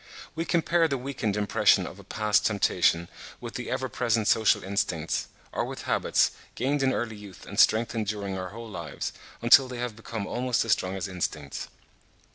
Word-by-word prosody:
We 165 - -3
compare 170 0 +2
the 140 -3 -1
weakened 125 -6 -2
impression 105 -1 +3
of - - -9
a - - -12
past 105 -1 +1
temptation 90 -5 +2 0.3
with 120 -1 -7
the 125 - -5
ever 130 0 -1
present 115 -4 0
social 110 +1 +4
instincts, 90 -4 -1 0.2
or - - -1
with - - -6
habits, - - +2 0.2
gained 140 +4 0
in 135 -1 +3
early 115 -4 -2
youth 105 -2 -12
and - - -5
strengthened 110 -1 +3
during 100 -2 -3
our 95 -1 -4
whole 115 +3 -9
lives, 105 - -5 0.3
until 130 +3 +7
they 125 -1 -6
have 120 -2 -3
become 110 -1 -5
almost 125 +3 0
as 115 - 0
strong 95 -2 +1
as 95 +1 -3
instincts. 80 -6 -4
110 Hz, 180 wpm, -27 LUFS, 100-125 Hz, 0.3 s, until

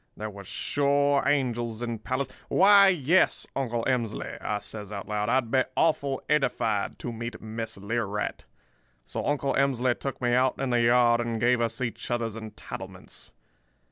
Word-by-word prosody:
There 110 0 -5
was 100 -1 -11
sure 140 +6 +2
angels 120 -5 0
in 115 -2 -3
Pales—Why, 185 - +4
yes, 175 -1 +3
Uncle 120 -4 -1
Emsley,' 120 -5 -2
I 105 - -1
says 105 0 -7
out 100 -2 -6
loud, 105 +1 -1
'I'd 120 -2 +1
be 130 - +4
awful 140 -4 +1
edified 120 -8 0
to 120 - -5
meet 115 +1 -6
Miss 110 0 -5
Learight.' 105 0 -3 0.6
"So - - -4
Uncle 140 -2 0
Emsley 130 -2 +2
took 135 - -4
me 120 -1 +1
out 130 +1 +2
in 135 -2 -1
the 120 -1 +3
yard 120 0 +4
and 115 -1 -2
gave 120 +1 +3
us 115 +1 -1
each 115 -3 -4
other's 115 -2 -1
entitlements. 110 -1 -9
120 Hz, 155 wpm, -27 LUFS, 110-135 Hz, 0.6 s, Pales—Why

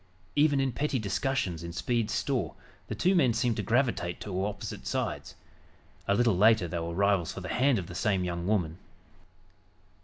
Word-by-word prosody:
Even 145 -1 +4
in 135 -1 +1
petty 140 +2 -1
discussions 100 - -1
in 85 0 -6
Speed's 115 +4 -1
store, - - -1 0.3
the - - -4
two 185 - +2
men 130 -11 +3
seemed 115 0 +1
to - - 0
gravitate 115 -8 0
to 95 -2 -2
opposite 105 0 -5
sides. - - -3 0.7
A 100 - +3
little 115 -2 +3
later 105 -1 +5
they 85 +1 -3
were 85 0 -4
rivals 100 -3 +2
for - - -7
the 90 - -6
hand 130 0 +3
of 95 - -3
the 90 - -9
same 95 +2 +1
young 85 0 -3
woman. 90 -5 0
105 Hz, 180 wpm, -29 LUFS, 90-125 Hz, 0.7 s, later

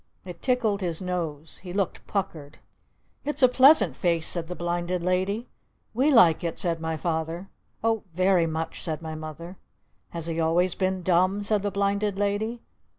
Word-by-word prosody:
It 180 -2 -9
tickled 235 -6 +1
his 170 -3 -2
nose. 165 -5 -4
He 180 - -9
looked 195 -2 -2
puckered. 155 -7 -4 0.7
"It's 295 -1 -1
a - - +9
pleasant 250 - +5
face!" 170 -1 +1
said 170 -2 +2
the 180 - -5
Blinded 175 +1 -2
Lady. 190 +6 -1 0.5
"We 260 +6 +2
like 175 - +5
it!" 170 - -3
said 165 -2 +1
my 160 0 -2
Father. 165 +3 -3 0.3
"Oh 225 -1 +1
very 185 -2 +3
much!" 160 0 -4
said 160 -1 -1
my 160 0 -5
Mother. 155 +3 -8 0.5
"Has 165 -2 -4
he 165 0 -2
always 170 +3 +2
been 185 -1 -1
dumb?" 185 +3 +2
said 205 0 +1
the 205 - -1
Blinded 200 0 -1
Lady. 205 +4 -1
180 Hz, 165 wpm, -26 LUFS, 165-200 Hz, 0.7 s, a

